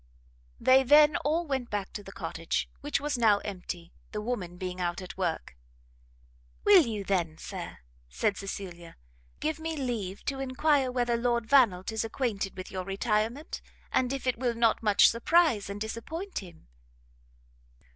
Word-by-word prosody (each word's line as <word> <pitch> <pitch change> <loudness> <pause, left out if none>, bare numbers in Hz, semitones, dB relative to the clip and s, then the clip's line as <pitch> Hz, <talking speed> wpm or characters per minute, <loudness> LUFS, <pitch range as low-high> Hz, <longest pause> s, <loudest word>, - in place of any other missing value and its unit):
They 260 +1 +6
then 295 +3 +6
all 320 +4 0
went 265 -5 -2
back 205 -2 -3
to 210 - -5
the 195 - -10
cottage, 165 -3 -3
which 290 0 -1
was 285 -3 -2
now 215 -3 +5
empty, 180 -3 -6 0.2
the 210 - -2
woman 210 -6 -4
being 185 0 -4
out 175 0 -1
at 185 -1 -8
work. 170 - -3 1.1
"Will 385 -8 +7
you 215 -3 -3
then, 175 -5 -1
Sir," - - -7 0.3
said 60 - 0
Cecilia, 185 -3 -7 0.5
"give 310 0 -1
me 320 0 -3
leave 225 -8 -3
to 275 -2 -2
enquire 270 0 +2
whether 240 -1 +1
Lord 235 -1 0
Vannelt 225 -8 +4
is 220 -1 -1
acquainted 220 -5 -2
with 185 - -7
your 185 -1 -3
retirement, 215 - -1 0.3
and 250 -1 +1
if 275 -1 -4
it 255 -3 0
will 245 -2 0
not 230 -1 +2
much 210 -2 +6
surprize 235 - +3
and 200 +1 -5
disappoint 315 - -5
him?" 175 - -13
225 Hz, 155 wpm, -29 LUFS, 195-270 Hz, 1.1 s, Will